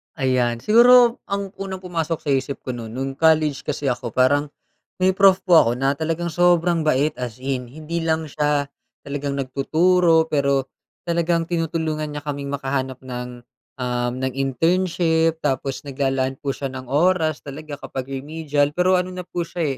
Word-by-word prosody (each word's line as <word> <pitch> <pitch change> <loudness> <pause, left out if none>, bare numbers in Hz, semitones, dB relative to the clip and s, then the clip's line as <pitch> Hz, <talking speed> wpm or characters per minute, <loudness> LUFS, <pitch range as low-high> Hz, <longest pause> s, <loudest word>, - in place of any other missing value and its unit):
Ayan. 125 -4 0
Siguro 240 - +6
ang 200 -1 -3
unang 190 -1 -5
pumasok 165 -3 -3
sa 145 - -4
isip 135 +1 -1
ko 130 - -3
no'n 115 -2 -7
nung 135 +2 -3
college 155 -3 +3
kasi 140 -2 -1
ako 120 -1 -5
parang, 145 +3 +3 0.5
may 185 0 +3
prof 190 -1 +5
po 175 -3 +7
ako 115 - +1
na 135 +2 +1
talagang 165 +2 -2
sobrang 175 0 +3
bait, 150 0 +1
as 125 -2 -5
in. 130 -1 -3
Hindi 155 +5 -5
lang 160 0 0
siya 145 -1 0 0.4
talagang 140 0 -3
nagtuturo 160 +5 +3
pero 140 -3 0 0.3
talagang 170 -1 +1
tinutulungan 160 -2 -2
niya 145 - -5
kaming 140 -1 -4
makahanap 135 -2 -2
ng, 125 -1 -7 0.3
uhm, 125 -1 -1
ng 130 0 -2
internship. 165 +4 +1
Tapos, 135 +1 -2
naglalaan 135 -1 -1
po 140 - -3
siya 135 -1 -4
ng 130 -1 -8
oras 160 +1 +1
talaga 145 +1 -7
kapag 135 -1 -6
remedial. 145 +1 -1
Pero 185 +2 +3
ano 180 0 -2
na 180 - -5
po 175 -1 -4
siya, 155 -6 -2
150 Hz, 160 wpm, -22 LUFS, 135-170 Hz, 0.5 s, po